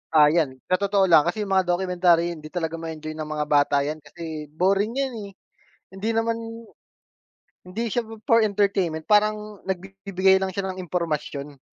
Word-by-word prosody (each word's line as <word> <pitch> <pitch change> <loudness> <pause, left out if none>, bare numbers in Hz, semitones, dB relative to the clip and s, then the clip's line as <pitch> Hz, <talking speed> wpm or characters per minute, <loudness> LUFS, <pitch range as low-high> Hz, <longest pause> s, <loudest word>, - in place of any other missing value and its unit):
Ah 150 -1 +8
yan, 155 -6 +1 0.2
sa 185 - +3
totoo 200 -1 +2
lang 155 -3 +7
kasi 215 -1 -1
yung 200 - -6
mga 190 -1 +3
documentary 175 -1 +2
hindi 155 -2 -8
talaga 165 -1 -3
ma-enjoy 160 -1 -6
ng 155 -1 -4
mga 150 -1 -2
bata 145 -1 +4
yan 155 +2 -3
kasi 155 -1 -8
boring 195 +6 +2
yan 275 -1 0 0.2
eh, - - -12 0.6
hindi 195 +4 -4
naman 225 0 +1 1.3
hindi 180 +5 -6
siya 240 - +1 0.2
for 230 0 +5
entertainment. 195 -6 0
Parang 210 0 +1
nagbibigay 190 0 +1
lang 190 - 0
siya 195 +1 -3
ng 185 - -7
impormasyon. 150 -5 -3
180 Hz, 165 wpm, -24 LUFS, 155-200 Hz, 1.3 s, Ah